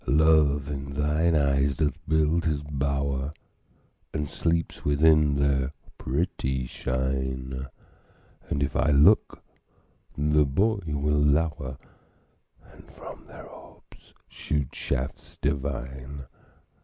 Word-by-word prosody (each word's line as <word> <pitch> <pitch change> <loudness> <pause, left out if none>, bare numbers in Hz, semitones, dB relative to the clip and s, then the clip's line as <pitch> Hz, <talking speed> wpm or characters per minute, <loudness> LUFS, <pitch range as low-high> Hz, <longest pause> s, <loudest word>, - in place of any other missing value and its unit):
Love 75 -2 +4
in 70 -1 -5
thine 75 +3 +2
eyes 70 -1 +2
doth 75 -4 +1
build 80 +2 +2
his 75 -3 0
bower, 70 -1 -2 0.8
And 75 -2 -2
sleeps 85 +3 -1
within 75 0 +4
their 70 -1 +1 0.3
pretty 65 -3 -1
shine; 65 +1 -3 0.8
And 70 - 0
if 70 - -3
I 75 - +2
look, 70 0 +4 0.7
the 75 +1 +3
boy 100 +10 +1
will 75 0 0
lower, 75 -2 +1 1.0
And - - -16
from - - -11
their - - -11
orbs - - -17
shoot 75 -4 -3
shafts 70 +1 -4
divine. 70 -1 -3
70 Hz, 105 wpm, -26 LUFS, 70-75 Hz, 1.0 s, Love